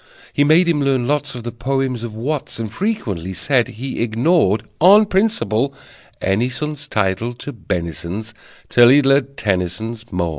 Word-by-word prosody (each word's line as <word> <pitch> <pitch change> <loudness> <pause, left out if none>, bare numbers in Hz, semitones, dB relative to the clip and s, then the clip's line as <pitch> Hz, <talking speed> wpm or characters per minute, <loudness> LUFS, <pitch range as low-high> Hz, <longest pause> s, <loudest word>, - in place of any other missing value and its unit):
He 145 - +3
made 160 +4 +4
him 160 -4 +1
learn 135 -3 +1
lots 145 0 -1
Of 120 - -7
the 120 - -4
poems 130 0 -2
of 115 -2 -6
Watts, 140 +6 -3
And 110 -2 -5
frequently 100 - -3
said 120 - +1
he 130 +3 -6
ignored, 115 - +2 0.2
On 200 +6 +7
principle, 140 - 0 0.4
any 100 +7 0
son's 150 +2 -5
Title 105 +1 -1
to 140 +4 -8
benisons 90 +2 -5 0.3
Till 120 -1 +6
he'd 140 +2 +5
learned 135 0 +2
Tennyson's 110 +4 -3
"Maud." 85 -1 -1
120 Hz, 155 wpm, -19 LUFS, 110-145 Hz, 0.4 s, On